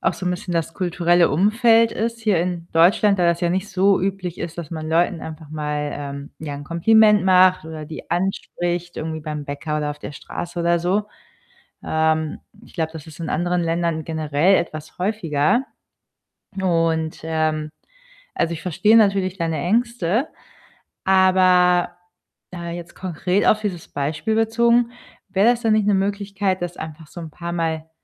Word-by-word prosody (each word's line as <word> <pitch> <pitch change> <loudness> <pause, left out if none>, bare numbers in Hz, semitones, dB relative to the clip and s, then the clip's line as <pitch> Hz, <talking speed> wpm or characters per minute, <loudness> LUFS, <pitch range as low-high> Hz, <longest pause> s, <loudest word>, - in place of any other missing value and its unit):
auch - - +1
so 185 - -6
'n - - +2
bisschen 180 0 -4
das 165 -1 -2
kulturelle 175 -1 +2
Umfeld 225 - +4
ist 230 +1 -3
hier 210 -6 +2
in 175 -1 -3
Deutschland, 195 +4 +4
da 175 - +2
das 170 +1 +2
ja 175 - +1
nicht 190 +3 -1
so 195 +1 +3
üblich 185 -2 -3
ist, 170 +1 -6
dass 165 -2 -6
man 155 -1 -5
Leuten 170 +1 +1
einfach 155 -1 -9
mal, 150 -1 -3
ähm, 140 0 -7
ja 150 -2 -5
'n 145 - -8
Kompliment 210 +5 +4
macht 185 -2 +5
oder 160 -1 -7
die 155 +1 -10
anspricht 175 -1 -2
irgendwie 160 0 -4
beim 150 -1 -5
Bäcker 145 +2 -4
oder 150 -1 -2
auf 150 - -7
der 145 - -8
Straße 175 +5 -7
oder 170 0 +2
so. 190 +5 0 0.8
Ähm, 160 -1 0 0.2
ich - - -18
glaube, 160 -1 -2
das 160 0 -9
ist 155 +1 -12
in 165 - -4
anderen 175 +2 0
Ländern 165 -1 -1
generell 160 +3 +2
etwas 155 -2 -5
häufiger. 190 - +1 1.0
Und, 165 -3 0
ähm, 155 -1 -1 0.7
also, 170 0 0
ich 165 - -8
verstehe 210 +6 +3
natürlich 195 -3 +3
deine 165 -2 -1
Ängste, 230 - 0 0.8
aber, 185 -2 +4 0.6
äh, 170 -1 -5
jetzt 175 0 -9
konkret 185 +2 -1
auf 215 - +4
dieses 185 -6 -4
Beispiel 155 +9 -2
bezogen: 235 +1 +3 0.4
wäre 195 +5 +3
das 240 -1 -2
denn 225 -2 +2
nicht 215 -2 +2
'ne 205 - +4
Möglichkeit, 200 -1 -1
das 175 0 -4
einfach 160 0 -8
so 175 - -10
'n 160 - -7
paar 170 +2 -6
Mal 160 -2 -2
175 Hz, 170 wpm, -21 LUFS, 160-195 Hz, 1.0 s, macht